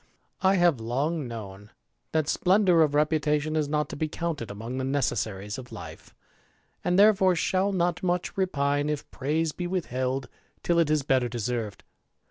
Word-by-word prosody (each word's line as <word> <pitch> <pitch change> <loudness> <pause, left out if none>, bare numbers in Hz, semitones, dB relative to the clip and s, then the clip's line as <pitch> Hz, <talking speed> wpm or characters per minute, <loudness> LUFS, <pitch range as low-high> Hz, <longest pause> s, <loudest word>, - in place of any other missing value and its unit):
J 190 - +3
^^ - - +7
I 195 - +4
have 175 -7 +3
long 135 +6 -1
known 105 -3 -8 0.4
that 155 -2 +1
splendour 180 -1 +4
of 150 -2 +3
reputation 150 0 +1
is 155 -2 +1
not 150 0 0
to - - -6
be 155 +2 -1
counted 155 -7 -4
among 115 +6 -5
the - - -2
necessaries 110 -6 -1
of 125 -1 -11
life, - - -10 0.7
and 180 0 +1
therefoce 195 -3 +5
shall 190 +3 +1
not 175 -3 0
much 180 +1 -1
repine 145 -6 0
if 150 -2 -3
praise 155 +4 -1
be 175 +3 -4
withheld 130 -7 -2 0.4
till 170 -1 +2
it 165 -3 +3
is 155 -2 +2
better 130 -2 +2
deserved. 120 -2 -3
150 Hz, 170 wpm, -27 LUFS, 130-175 Hz, 0.7 s, ^^